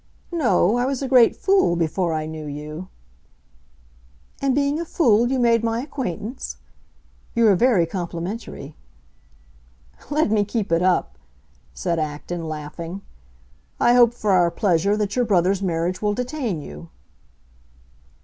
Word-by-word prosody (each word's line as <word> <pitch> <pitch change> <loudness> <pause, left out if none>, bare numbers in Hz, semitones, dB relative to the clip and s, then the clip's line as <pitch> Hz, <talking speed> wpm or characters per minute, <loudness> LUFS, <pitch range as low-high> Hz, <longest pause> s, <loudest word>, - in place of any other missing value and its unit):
"No, 240 - +2
I 245 - +1
was 275 0 -2
a - - -1
great 250 -3 +5
fool 385 - +2
before 170 +1 0
I 155 -1 -2
knew 155 -1 -7
you!" 150 +4 -7 1.5
"And 270 -2 +1
being 285 +2 +1
a - - -2
fool 240 -9 +3
you 265 - 0
made 230 -2 +3
my 230 0 0
acquaintance? 250 - -5 0.8
You 235 -1 +4
are 200 - +5
very 210 -4 +3
complimentary." 170 -2 -6 1.3
"Let 295 -5 +1
me 210 -2 +3
keep 205 -2 -3
it 165 +1 +3
up," 185 0 +1 0.6
said 170 -3 -1
Acton, 155 +2 -4
laughing. 165 +5 -7 0.8
"I 240 - +4
hope, 240 -1 +5
for 215 -3 -1
our 180 -2 +4
pleasure, 195 +2 +1
that 205 -1 -2
your 250 - +2
brother's 195 -3 +2
marriage 175 0 -1
will 210 -1 0
detain 250 - -3
you." 170 - -10
200 Hz, 140 wpm, -22 LUFS, 170-240 Hz, 1.5 s, great